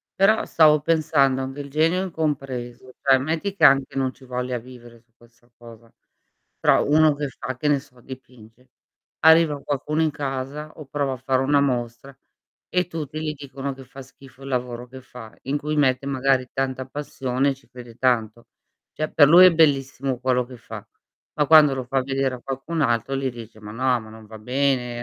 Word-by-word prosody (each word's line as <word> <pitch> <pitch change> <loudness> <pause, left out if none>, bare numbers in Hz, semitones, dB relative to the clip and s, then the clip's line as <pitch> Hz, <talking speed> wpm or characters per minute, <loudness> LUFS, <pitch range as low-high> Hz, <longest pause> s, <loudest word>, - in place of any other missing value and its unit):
Però, 205 +3 +3
stavo 155 -2 +4
pensando 145 -4 +2
a - - -2
un 130 - -6
bel 140 0 -8
genio 165 +5 +1
incompreso, 130 -7 -4
cioè, 135 -1 +5
metti 160 +8 -3
che 165 - -4
anche 135 -2 +5
non 130 -1 -1
ci - - -20
voglia 125 0 -3
vivere 120 -1 -14
su 115 0 -38
questa 120 0 -25
cosa. 115 -1 -15 0.7
Però, - - +3
uno 155 0 +4
che 145 -1 -4
fa 130 -1 -7
che 150 - -2
ne 145 -2 +3
so 130 -3 -20
dipinge, 125 -2 -14 0.5
arriva 160 -2 +5
qualcuno 150 +3 -2
in 155 - +1
casa, 140 +1 -5
o 155 - -10
prova 140 0 -2
a - - -6
fare 130 +1 0
una 140 +2 +2
mostra, 125 0 -3 0.5
e 180 0 +1
tutti 155 -3 -6
li 155 -1 -3
dicono 140 -1 -6
che 135 0 -12
fa 135 +2 -12
schifo 135 +1 -17
il 135 - -8
lavoro 125 -1 -3
che 130 +1 -12
fa, 125 -3 -12
in 140 +3 -1
cui 150 +1 -3
mette 135 -2 +1
magari 135 -1 +1
tanta 130 -1 -2
passione, 135 -1 -2
e - - -5
ci 135 - -25
crede 120 -2 -12
tanto. 120 -2 -1 0.5
Cioè, 155 0 -3
per 145 - +6
lui 175 +5 +8
è 185 - +7
bellissimo 135 -4 +1
quello 125 -1 0
che 125 0 -12
fa, 115 - -10 0.5
ma 150 -2 0
quando 155 -3 +7
lo 130 - -4
fa 135 +2 0
vedere 135 -1 -1
a 125 - -13
qualcun 135 +5 -4
altro 120 0 0
gli 135 -1 -2
dice: 115 -2 -12
"Ma 105 0 -9
no, 125 +2 +1
ma 110 - -13
non 110 0 -13
va 110 +1 -11
bene" 125 0 -1
135 Hz, 195 wpm, -23 LUFS, 125-145 Hz, 0.7 s, lui